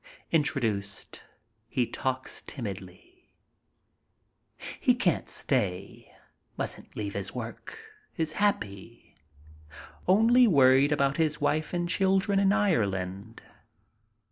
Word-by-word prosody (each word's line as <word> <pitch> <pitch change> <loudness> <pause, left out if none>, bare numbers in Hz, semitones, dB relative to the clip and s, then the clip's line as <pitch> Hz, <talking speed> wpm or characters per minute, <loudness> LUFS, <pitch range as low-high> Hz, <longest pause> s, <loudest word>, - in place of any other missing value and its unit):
Introduced, 115 -11 -1 0.4
he 125 +1 0
talks 130 +2 -3
timidly. 115 - -9 1.5
He 250 - +3
can't 190 -9 0
stay, 100 -8 -2 0.5
mustn't - - -5
leave 100 -2 -3
his 100 +2 -4
work. 120 - -7 0.4
Is 160 -2 0
happy. 115 - -2 0.9
Only 230 +6 +5
worried 135 -4 +5
about 140 -1 +1
his 155 -2 0
wife 150 +1 0
and 175 -1 -1
children 195 +2 +2
in 195 0 +3
Ireland. 105 - -1
140 Hz, 90 wpm, -28 LUFS, -, 1.5 s, Only